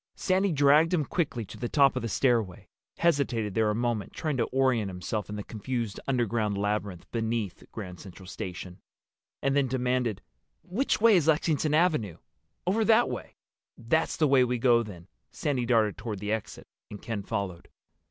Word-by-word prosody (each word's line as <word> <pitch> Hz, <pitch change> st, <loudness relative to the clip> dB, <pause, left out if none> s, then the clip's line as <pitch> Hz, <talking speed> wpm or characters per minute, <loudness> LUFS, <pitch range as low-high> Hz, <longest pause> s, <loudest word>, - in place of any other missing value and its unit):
Sandy 190 Hz, +1 st, +1 dB
dragged 150 Hz, +4 st, +4 dB
him 155 Hz, -4 st, 0 dB
quickly 135 Hz, -8 st, -2 dB
to -, -, -11 dB
the 120 Hz, -, -3 dB
top 140 Hz, -3 st, +4 dB
of 130 Hz, -, -1 dB
the 115 Hz, -, -3 dB
stairway, 115 Hz, -6 st, 0 dB, 0.3 s
hesitated 130 Hz, -, +1 dB
there 110 Hz, +1 st, +2 dB
a 105 Hz, -, 0 dB
moment 115 Hz, -3 st, -2 dB
trying 155 Hz, -3 st, -2 dB
to 115 Hz, -, +2 dB
orient 130 Hz, -6 st, +1 dB
himself 95 Hz, +3 st, -4 dB
in 105 Hz, -, -5 dB
the 105 Hz, -, -5 dB
confused 115 Hz, -1 st, -4 dB
underground 115 Hz, -5 st, 0 dB
labyrinth 105 Hz, -3 st, -2 dB
beneath 115 Hz, -4 st, -2 dB
Grand 90 Hz, -5 st, -7 dB
Central 95 Hz, -1 st, -12 dB
Station, 90 Hz, -1 st, -7 dB, 0.6 s
and 135 Hz, 0 st, +2 dB
then 140 Hz, -2 st, +3 dB
demanded, 125 Hz, -3 st, -1 dB, 0.4 s
"Which 245 Hz, +10 st, 0 dB
way 225 Hz, -1 st, +6 dB
is 160 Hz, -3 st, +1 dB
Lexington 155 Hz, -1 st, +2 dB
Avenue?" 155 Hz, -, +1 dB, 0.5 s
"Over 205 Hz, +5 st, +2 dB
that 225 Hz, +2 st, +4 dB
way." -, -, -7 dB, 0.4 s
"That's 160 Hz, +8 st, 0 dB
the 155 Hz, -, +3 dB
way 135 Hz, -2 st, +5 dB
we 125 Hz, 0 st, 0 dB
go 120 Hz, -1 st, +4 dB
then." 90 Hz, -6 st, -9 dB, 0.2 s
Sandy 130 Hz, -5 st, -2 dB
darted 110 Hz, -5 st, +2 dB
toward 105 Hz, -1 st, -4 dB
the 105 Hz, +2 st, -4 dB
exit, 110 Hz, -1 st, -4 dB, 0.2 s
and 105 Hz, -, -8 dB
Ken 110 Hz, -3 st, -4 dB
followed. 100 Hz, -4 st, -4 dB
120 Hz, 170 wpm, -28 LUFS, 105-140 Hz, 0.6 s, way